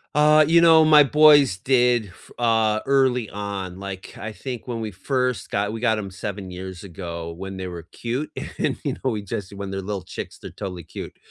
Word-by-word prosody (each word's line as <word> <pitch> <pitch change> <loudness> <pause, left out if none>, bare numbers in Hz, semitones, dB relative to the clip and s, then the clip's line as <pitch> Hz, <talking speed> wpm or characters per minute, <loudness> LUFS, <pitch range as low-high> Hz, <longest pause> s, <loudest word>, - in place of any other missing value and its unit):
Uh, 150 0 +6
you 170 +1 +5
know, 160 -1 +7
my 155 -1 +8
boys 145 -6 +6
did 125 -1 +2
f 90 - -18
uh, 110 -2 +2
early 130 -4 +2
on, 100 -2 -5
like, 95 -1 -7
I 110 +2 -6
think 125 +2 -7
when 120 -2 -3
we 110 -1 -4
first 125 +6 -1
got 100 +1 -1
we 115 - -4
got 110 -3 +2
‘em 100 -2 -5
7 100 -1 -6
years 95 0 -8
ago 85 -3 -6
when 95 +3 -7
they 95 - -5
were 85 -2 -6
cute, 125 +6 -4 0.3
and, - - 0
you - - -1
know, 130 - -2
we 105 -4 -3
just 100 -1 -5
when 100 -1 -6
they're 95 0 -3
little 100 -1 -4
chicks, - - -7
they're - - -10
totally 90 -4 -6
cute, 80 - -9
105 Hz, 205 wpm, -23 LUFS, 95-125 Hz, 0.3 s, my